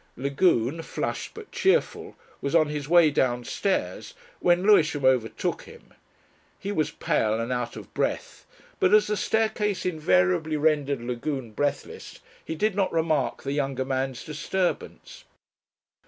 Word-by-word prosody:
Lagune, 140 +1 +1
flushed - - -4
but 440 -1 -11
cheerful, 395 +5 0 0.3
was 140 +4 -1
on 155 -2 +4
his 150 -1 -4
way 170 -3 +6
downstairs 130 - -1 0.2
when 175 +1 +3
Lewisham 165 -9 +4
overtook 120 -5 +1
him. - - -16 0.6
He 200 - -5
was 155 -6 0
pale 110 -8 0
and 115 +2 -3
out 125 -1 -2
of - - -11
breath, - - -3 0.3
but 185 +3 +5
as 215 0 +5
the 210 - -1
staircase 215 -1 0
invariably 150 - +1
rendered 145 -3 +1
Lagune 125 0 -4
breathless 145 +6 -3 0.3
he 160 - -5
did 210 +5 +1
not 195 -1 0
remark 160 -4 0
the 140 - -3
younger 135 -2 -1
man's 130 -1 -2
disturbance. 190 - -3
150 Hz, 135 wpm, -26 LUFS, 130-185 Hz, 0.6 s, way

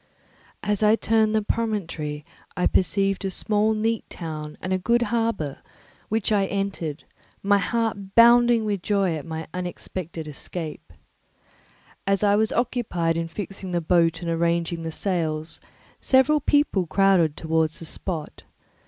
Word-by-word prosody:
As 210 -1 0
I 215 +1 +5
turned 220 -1 +2
the 215 - +2
promontory 165 -10 -2 0.3
I 180 - +1
perceived 195 +1 +1
a 195 - -1
small 215 +3 +1
neat 225 +1 0
town 155 -3 -6
and 185 - -2
a 185 - +1
good 235 +5 +2
harbour, 225 -12 -1 0.5
which 220 0 0
I 200 -2 +3
entered, 195 -7 -3 0.4
my 200 0 +4
heart 215 -3 -2
bounding 235 -1 +6
with 205 -3 -1
joy 195 -4 +1
at 155 +1 -7
my 160 0 -5
unexpected 175 -2 -5
escape. 155 - -7 1.2
As 195 0 +2
I 205 0 +4
was 220 +1 +2
occupied 210 -9 0
in 165 0 -2
fixing 190 +1 -6
the 175 - +2
boat 165 0 +2
and 170 - -2
arranging 170 0 0
the 165 - -4
sails, 160 -3 -2 0.4
several 265 +3 +4
people 285 - +2
crowded 185 -5 +3
towards 160 -1 0
the 165 - -6
spot. 160 -1 -4
190 Hz, 145 wpm, -24 LUFS, 165-215 Hz, 1.2 s, bounding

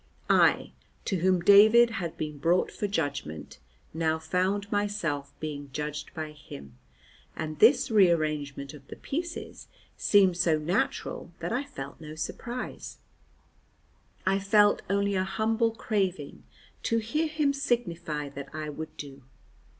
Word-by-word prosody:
I - - +4 0.3
to 195 - 0
whom 185 +1 +2
David 215 +5 +7
had 175 -7 -4
been 150 -2 -5
brought 170 +5 +2
for 205 - -3
judgment, 140 - -4 0.3
now 160 0 +1
found 190 +5 -1
myself 200 -9 -1
being 145 -2 -5
judged 150 +1 -4
by 155 -1 -4
him, 70 - -12 0.6
and 155 -1 -5
this 240 +2 +5
rearrangement 155 -8 +2
of 140 -2 -14
the - - -8
pieces 340 +4 -5 0.3
seemed 190 -4 +4
so 170 -3 +3
natural 180 - -2
that - - -4
I 255 +4 0
felt 140 - -9
no 155 0 -8
surprise; 240 +10 -6 1.3
I 195 +1 +2
felt 205 +1 +4
only 200 +1 +1
a 185 -1 +1
humble 220 +4 +1
craving 195 -9 -2 0.4
to 230 - +1
hear 265 +9 0
him 305 -2 +1
signify 170 - -2
that 140 0 -8
I 155 -1 -4
would 155 +1 -7
do. 140 -1 -9
180 Hz, 135 wpm, -28 LUFS, 150-210 Hz, 1.3 s, David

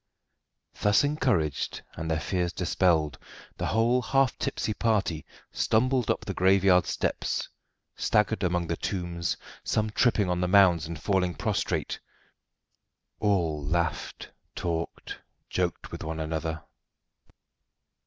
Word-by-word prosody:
Thus 105 +5 +4
encouraged, 120 - 0
and 80 0 -5
their 80 -1 +1
fears 90 0 -1
dispelled, 85 -4 +1 0.4
the - - -2
whole 120 +3 +2
half 135 +2 +2
tipsy 110 - -1
party 100 -9 0 0.2
stumbled 125 +1 +1
up - - 0
the - - -3
graveyard 95 -1 +4
steps, - - -1 0.5
staggered 105 -3 +1
among 90 -2 +1
the 85 0 -2
tombs, 85 -3 -2 0.3
some 110 0 0
tripping 110 -3 +2
on 90 0 0
the 90 - +1
mounds 90 -4 +5
and 85 0 -6
falling 95 -3 +1
prostrate. 100 -8 -1 1.2
All 85 -8 +1
laughed, 80 +1 -2 0.2
talked, 85 -1 -4 0.3
joked 90 -2 -2
with - - -6
one 80 0 -4
another. 80 0 -3
90 Hz, 115 wpm, -27 LUFS, 80-105 Hz, 1.2 s, mounds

